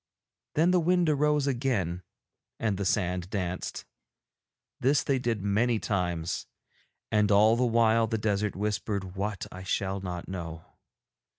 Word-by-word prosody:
Then 165 +4 +4
the 180 - +4
wind 175 0 +2
arose 150 -1 +2
again 120 - -1 0.6
and 110 -3 0
the 100 - -1
sand 90 -2 0
danced. 90 -3 -3 0.9
This 140 +3 +3
they 135 -2 +1
did 115 -5 -1
many 110 +4 +2
times. 90 -5 -2 0.6
And 105 -1 +3
all 105 +3 +6
the 125 +1 +2
while 115 -1 +3
the 115 0 -1
desert 105 -1 0
whispered 100 -1 -2
what 100 0 -3
I 90 - -8
shall 95 +1 -1
not 90 -2 -5
know. 85 -3 -6
105 Hz, 135 wpm, -28 LUFS, 95-120 Hz, 0.9 s, all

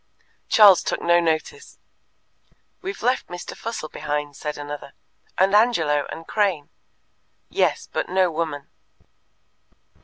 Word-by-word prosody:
Charles 205 -5 +7
took - - -2
no 170 0 +3
notice. 170 - -2 1.0
"We've 390 +2 -6
left 250 +2 +1
Mr. 175 0 -8
Fussell 225 -8 -5
behind," 150 -1 -4
said 150 +1 -5
another; 145 -1 -7 0.4
"and 190 +2 +3
Angelo, 165 -10 +3
and 165 - -8
Crane." 190 -9 0 0.8
"Yes, - - 0
but - - -2
no 185 -1 +2
woman." 155 -3 -3
170 Hz, 115 wpm, -23 LUFS, 150-205 Hz, 1.0 s, Charles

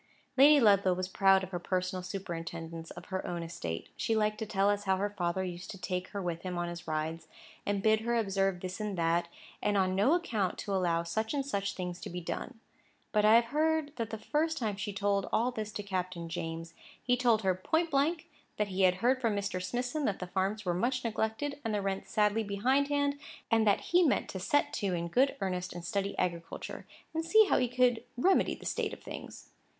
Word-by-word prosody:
Lady 285 +3 +8
Ludlow 200 -5 +5
was 185 0 -2
proud 195 0 +4
of 185 - -6
her 175 - -2
personal 185 +1 -1
superintendence 165 -3 -6
of - - -10
her 190 - -1
own 170 -1 -3
estate. 85 - -5
She 225 - 0
liked 215 0 +1
to 220 - -3
tell 195 -1 +2
us 205 0 -2
how 190 -1 +2
her 205 +2 -1
father 185 -1 -1
used 180 0 -6
to 195 - -6
take 180 0 -3
her 200 - -5
with 175 -3 -3
him 180 -1 -4
in 175 0 -1
his 170 -1 -8
rides, 160 +1 -3 0.4
and 200 -1 0
bid 220 0 +4
her 235 +2 -1
observe 195 -4 +1
this 185 +2 -5
and 210 -3 -3
that, 170 +1 +2 0.3
and 205 -1 +1
on 185 -1 +2
no 205 - +4
account 220 - -1
to 200 - -4
allow 170 -3 +1
such 220 - -2
and 275 -1 -1
such 200 -7 -1
things 180 -1 -5
to - - -6
be 180 - -4
done. 225 +7 -5 0.5
But 210 -1 +3
I 215 +1 +7
have 235 0 +4
heard 310 -1 +1
that 230 -2 -2
the 220 - -4
first 315 +7 0
time 215 -6 -1
she 205 +1 -4
told 200 0 0
all 240 +3 +2
this 215 -3 -4
to 205 - -4
Captain 185 -3 -3
James, 165 0 -5 0.3
he 245 - +2
told 235 -3 +3
her 190 -1 +3
point 320 - 0
blank 310 +4 +1 0.3
that 210 -1 0
he 190 0 -1
had 185 -1 +5
heard 255 +1 +3
from 225 -4 +1
Mr. 200 -2 -2
Smithson 245 +10 -2
that 200 - 0
the 180 - -5
farms 195 +4 -1
were 175 - +1
much 250 +8 0
neglected 230 +6 -2
and 225 -2 -1
the - - +1
rents 195 0 -3
sadly 210 +1 +2
behindhand, 280 +7 +1 0.3
and 225 -1 +4
that 200 - +4
he 355 +1 +3
meant 305 -6 +2
to 190 - -5
set 290 +10 +1
to 195 -4 -1
in 170 0 -3
good 265 +9 +3
earnest 180 -1 -2
and 175 -1 -7
study 200 +3 -2
agriculture, 170 -2 -3 0.3
and 325 0 -1
see 435 +6 +6
how - - +3
he 250 - +2
could 245 -1 +2
remedy 370 +9 +3
the - - -13
state - - -1
of - - -10
things. - - -9
200 Hz, 220 wpm, -31 LUFS, 180-235 Hz, 0.5 s, Lady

